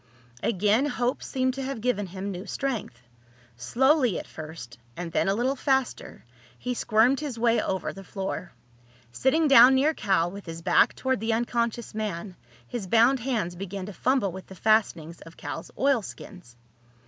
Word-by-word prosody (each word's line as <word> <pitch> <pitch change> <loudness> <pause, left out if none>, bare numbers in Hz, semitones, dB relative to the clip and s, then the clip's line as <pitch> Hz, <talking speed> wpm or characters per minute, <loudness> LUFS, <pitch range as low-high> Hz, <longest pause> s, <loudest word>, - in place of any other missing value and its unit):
Again 215 +6 +2
hope 250 -2 -1
seemed 260 -1 -1
to 270 - -5
have 270 -2 -4
given 210 -4 -1
him 190 +2 -5
new 185 +2 -7
strength. 225 - -4 0.5
Slowly 250 - +2
at - - -6
first, 155 -7 -10 0.2
and 175 -1 -5
then - - +1
a 195 - +2
little 255 +5 0
faster, 265 -1 -1 0.3
he 250 - -3
squirmed 240 +3 +3
his 290 -6 -5
way 230 0 +2
over 190 -1 -2
the 195 - -10
floor. 190 -2 -5 0.6
Sitting 305 - +2
down 265 -1 +8
near 290 +4 +3
Cal, 190 - +1
with 200 -1 -10
his 165 0 -7
back 175 -1 +4
toward 260 -3 -1
the 225 +1 0
unconscious 235 0 -1
man, 205 -3 -4 0.3
his 210 - -5
bound 235 +6 +4
hands 225 -8 -2
began 195 +1 -6
to 205 - -8
fumble 250 -3 +1
with 190 +1 -9
the 190 - -11
fastenings 180 -6 +1
of 165 - -13
Cal's 155 +3 -6
oilskins. 210 - -2
215 Hz, 165 wpm, -26 LUFS, 185-255 Hz, 0.6 s, down